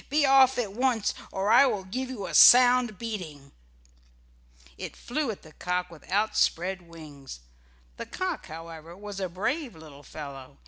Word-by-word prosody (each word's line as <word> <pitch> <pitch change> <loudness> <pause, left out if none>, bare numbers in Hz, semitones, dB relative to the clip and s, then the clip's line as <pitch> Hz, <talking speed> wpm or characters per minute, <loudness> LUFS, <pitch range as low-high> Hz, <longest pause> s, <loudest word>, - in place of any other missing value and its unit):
Be 290 +1 +2
off 270 -1 +5
at 215 -5 -2
once 245 -2 0 0.2
or 195 +2 -1
I 260 +4 +7
will 210 -6 -2
give 255 +8 -5
you 225 -7 -6
a - - -7
sound 245 -3 +7
beating." 170 -12 -7 1.2
It - - -8
flew 285 +2 -3
at 215 - -6
the 155 - -15
cock 180 +1 -3
with 165 - -15
outspread 190 -2 0
wings. 150 - -12 0.6
The - - -7
cock, 370 -3 -4
however, 165 +1 -10
was 205 -1 -8
a 190 -2 -3
brave 235 - -3
little 155 -3 -13
fellow. 140 -3 -10
195 Hz, 155 wpm, -27 LUFS, 165-245 Hz, 1.2 s, I